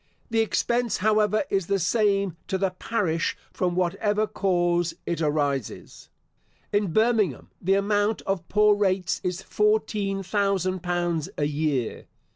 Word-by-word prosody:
The 225 - +2
expense, 235 +1 +1
however, 215 +2 +2
is 195 -3 0
the 200 - +2
same 195 -1 +1
to 190 - -1
the 190 -1 0
parish 180 -4 -1 0.2
from 180 -1 -1
whatever 205 +4 +1
cause 175 -4 0
it 170 -1 -2
arises. 145 -5 -2 0.6
In 205 -3 +1
Birmingham, 215 - +1
the 190 +2 +2
amount 205 +2 +1
of 195 -4 -3
poor 210 0 +5
rates 190 -3 0
is 180 +1 -3
fourteen 210 -2 0
thousand 190 -2 0
pounds 175 -3 -1
a 145 - +1
year. 145 -5 -2
195 Hz, 130 wpm, -25 LUFS, 175-210 Hz, 0.6 s, poor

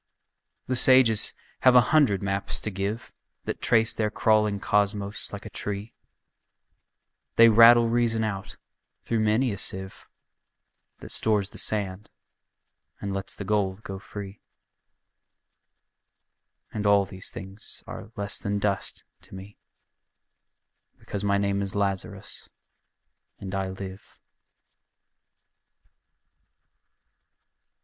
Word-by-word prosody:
The 130 - -2
sages 125 -3 +5 0.2
have 130 -1 +5
a - - +10
hundred 125 -11 +3
maps 100 0 -1
to 105 - -4
give 100 +4 -4 0.3
That - - -5
trace 110 0 +3
their 110 -1 -1
crawling 105 -1 +1
cosmos 100 0 -1
like - - -8
a - - -7
tree, 105 +2 -6 1.4
They 115 0 +7
rattle 115 +1 +7
reason 115 -1 +1
out 100 -3 -5 0.5
through 115 - -1
many 110 +4 +1
a 100 - -5
sieve 95 0 -3 0.9
That - - -8
stores 105 -2 +2
the - - -9
sand 100 -1 +1 0.9
and 100 -1 -4
lets 95 0 -4
the - - -6
gold 100 0 -1
go 95 -1 -7
free: 100 0 -9 2.3
And 105 -1 -2
all 100 -1 +4
these 95 0 -4
things 95 +2 -2
are - - -9
less 100 0 -1
than 100 -1 -2
dust 100 -1 -2 0.2
to - - -14
me 95 +2 -12 1.4
Because 100 0 -6
my 100 0 +2
name 100 0 0
is 100 0 -4
Lazarus 100 -1 -3 0.9
and 95 0 -8
I 95 -1 -2
live. 95 0 -9
100 Hz, 110 wpm, -26 LUFS, 95-110 Hz, 2.3 s, a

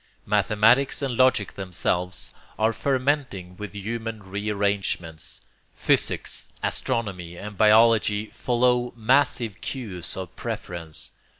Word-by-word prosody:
Mathematics 110 +7 +3
and 130 -3 -1
logic 130 -5 +3
themselves 90 -1 -2 0.2
are 110 +1 +2
fermenting 130 -9 -1
with 105 -3 -7
human 110 +1 -5
rearrangements; 100 -4 -2 0.3
physics, - - 0
astronomy 90 -7 -2
and 105 +2 -7
biology 110 0 +5
follow 125 +1 +1
massive 120 -3 +2
cues 100 -12 -3
of 95 -2 -6
preference. 85 -3 -5
105 Hz, 95 wpm, -25 LUFS, 95-120 Hz, 0.3 s, biology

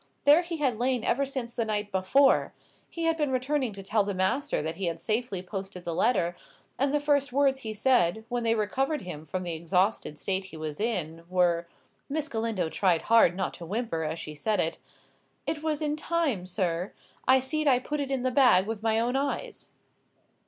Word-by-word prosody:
There 295 +4 +7
he 340 -1 -5
had 260 -7 0
lain 250 -1 +1
ever 275 +3 +1
since 255 -3 -4
the 235 - 0
night 210 -2 -2
before: 195 +9 +3 0.3
he 335 - -5
had 330 0 +2
been 300 -3 0
returning 260 0 0
to 195 0 -8
tell 210 +2 +2
the 200 -1 -3
master 260 +11 0
that 160 +1 -3
he 195 - -2
had 165 -1 -2
safely 215 -1 -1
posted 190 -1 -6
the 170 - -3
letter, 175 -4 +1 0.4
and 275 +1 +2
the 295 - +2
first 285 -2 +1
words 270 0 +2
he 220 -4 -5
said, 220 -3 +2
when 245 0 -2
they 230 -1 +2
recovered 265 +7 0
him 160 -4 -7
from 185 +4 -3
the 175 -1 -3
exhausted 180 0 0
state 190 +2 -1
he 175 -4 -10
was 155 -1 -5
in, 170 -8 -2
were" 175 -2 +2 0.4
(Miss 305 +1 -2
Galindo 225 -7 -1
tried 175 0 +1
hard 225 -6 +5
not 190 -1 -2
to 170 - -9
whimper, 205 -5 -2
as 155 +1 -3
she 155 - -6
said 210 +8 -1
it), - - 0 0.7
"'It 300 - -2
was 310 -1 -1
in 300 0 0
time, 310 - -1
sir. 180 -1 -1 0.3
I 260 0 +6
see'd 300 +4 -1
it 255 -2 +4
put 300 0 -3
in 270 -2 -1
the 255 - +1
bag 245 -8 +5
with 220 0 -4
my 225 0 +2
own 240 +3 0
eyes. 285 - -3
225 Hz, 200 wpm, -28 LUFS, 185-270 Hz, 0.7 s, There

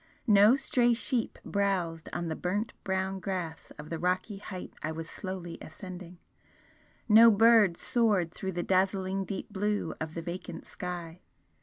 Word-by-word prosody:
No 210 +1 +7
stray 245 -3 +2
sheep 235 0 -2
browsed 185 -5 -1
on 170 - -3
the 160 - -2
burnt 205 +7 -2
brown 190 0 -1
grass 180 -4 -4
of 150 +2 -10
the 165 - -3
rocky 185 +4 -1
height 185 -3 -8
I 155 - -2
was 160 0 -6
slowly 185 -2 -6
ascending 180 +1 -9 0.9
no 225 +1 +9
bird 220 -4 +5
soared 205 -8 +1
through 190 -1 -4
the 175 0 -2
dazzling 190 0 +1
deep 200 +1 -6
blue 205 -3 -1
of 160 0 -4
the 165 - -4
vacant 175 0 -6
sky. 175 -1 -6
190 Hz, 150 wpm, -29 LUFS, 170-205 Hz, 0.9 s, no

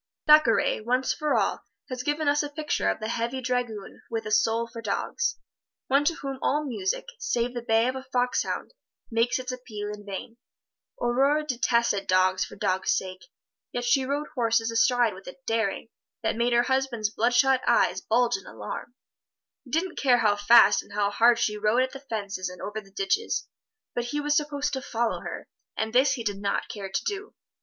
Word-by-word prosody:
Thackeray, 300 -9 +5
once 255 +3 +1
for 300 -1 0
all, - - +1 0.3
has 255 -1 -4
given 295 +3 -1
us 290 +1 +3
a 295 - -4
picture 300 +1 -1
of - - -1
the 215 - -4
heavy 235 +3 -2
dragoon 245 -5 -3
with 225 -1 -3
a 215 - -4
soul 225 +2 +2
for 230 0 -9
dogs 465 - -1 0.5
one 275 +2 +4
to 335 - +2
whom 270 -3 -6
all 300 +2 +1
music, 210 -8 -2
save 240 - -1
the 240 - -4
bay 225 0 +2
of 255 - -1
a 265 - -4
fox 250 -1 +1
hound, - - -4 0.4
makes 230 +1 +2
its 255 0 -4
appeal 215 -5 -6
in 205 0 -10
vain. 205 +3 -7 0.6
Aurore 275 +5 +2
detested 235 -6 +1
dogs 185 0 +3
for - - -8
dogs' 185 +1 +1
sake, 185 0 -6 0.5
yet 245 0 -2
she 265 +2 +3
rode 285 +3 -2
horses 230 -3 +1
astride 235 -1 +3
with 190 +1 -13
a 180 - -8
daring 225 -1 -1 0.3
that 220 - 0
made 240 +1 +1
her 240 0 +4
husband's 260 -5 0
bloodshot 250 +3 +3
eyes - - +3
bulge 245 -3 +2
in 195 - -14
alarm. 245 - -7 0.7
He - - -14
didn't 330 +7 0
much - - -16
care 255 -3 +5
how 215 -3 +3
fast 205 0 +6
and - - -16
hard 210 +4 +3
she 210 -3 0
rode 215 +4 +3
at 260 - -3
the 270 - -8
fences 205 -8 -4
and 180 -1 -11
over 210 +4 -5
the 195 - -19
ditches, 400 - -1 0.5
but 240 - -2
he 290 +5 -2
was 295 0 +1
supposed 295 -1 0
to 265 - -2
follow 235 -3 -1
her, - - -7 0.3
and 220 0 -2
this 260 +3 +4
he 235 - -4
did 205 -3 -2
not 200 -1 -1
care 200 -2 -6
to 190 - -2
do. 410 0 -4
240 Hz, 195 wpm, -26 LUFS, 215-265 Hz, 0.7 s, fast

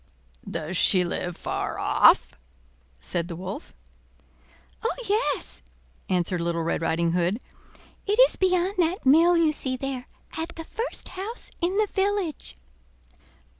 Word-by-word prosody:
"Does 160 +4 -4
she 185 0 +5
live 175 0 -3
far - - -3
off?" - - +4 0.7
said 170 - -2
the 170 - -6
Wolf. 190 - -7 1.1
"Oh! 455 - -1
yes," 425 +4 -1 0.5
answered 180 -1 0
Little 170 -1 -1
Red 165 - -1
Riding 165 +1 +1
Hood; 180 +5 +1 0.7
"it 415 +2 +1
is - - -8
beyond 370 +1 +1
that 345 0 +1
mill 335 +6 +6
you 325 -2 +4
see 260 -4 -3
there, 260 -1 -4 0.3
at 325 +1 -4
the 325 - -7
first 460 +7 -4
house 400 +6 -6
in 360 +3 0
the 430 - +4
village." 385 - -1
290 Hz, 130 wpm, -26 LUFS, -, 1.1 s, mill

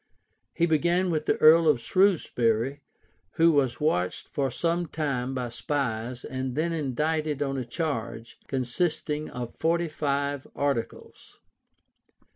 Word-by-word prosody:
He 170 - +3
began 175 +3 +2
with 155 -2 -2
the - - +2
earl 160 +1 +7
of 150 -5 +4
Shrewsbury, 135 - +1 0.6
why 165 - +4
was 140 -7 +3
watched 90 - 0
for 140 -4 -1
some 170 +6 -1
time 135 -5 -2
by 125 -2 -2
spies, 120 -2 -3
and 130 -1 -4
then 165 +2 0
indicted 150 0 -1
on 135 -1 -2
a 130 -2 -3
charge, 120 -4 -4
consisting 150 +3 -1
of 120 -2 -6
forty 170 +1 0
five 140 -2 -2
articles. 140 -5 -4
145 Hz, 125 wpm, -27 LUFS, 125-160 Hz, 0.6 s, earl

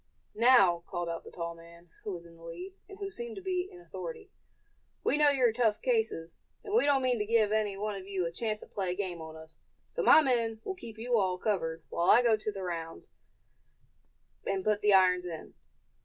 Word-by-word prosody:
"Now," 205 -8 +5
called 175 -1 -3
out 165 0 -4
the - - -11
tall 170 -1 -5
man 170 0 -16
who 210 - -4
was 170 -2 -7
in 165 0 -15
the 165 - -19
lead, 265 - -8 0.2
and 390 - -10
who 395 -1 -5
seemed 235 -7 -6
to - - -7
be 370 -1 -1
in 360 - -12
authority, 435 +2 -8 0.7
"we - - +2
know 295 -1 +5
you're 255 -5 +3
tough 225 -3 +2
cases, 445 - -1 0.3
and 410 - -6
we 445 - +4
don't 275 -2 +3
mean 250 -2 +1
to 210 - 0
give 220 -2 +3
any 210 -2 0
one 210 +1 -2
of 195 -1 -8
you 190 -3 -1
a 170 - -3
chance 215 +4 -3
to - - -10
play 190 -3 -3
a - - -7
game 180 -4 -4
on 160 0 -9
us; 160 0 -13 0.3
so - - -2
my 315 - +7
men 230 -4 0
will 385 - -3
keep 235 - -10
you 235 +1 +1
all 185 -2 0
covered, 165 -6 -2
while 170 - +1
I 245 - +7
go 230 -2 +5
the 210 -2 -5
rounds, 165 -2 -6 1.4
and 195 -1 -1
put 210 -1 +2
the 210 - +4
irons 180 -2 +4
on." 165 -2 -8
210 Hz, 220 wpm, -30 LUFS, 175-250 Hz, 1.4 s, my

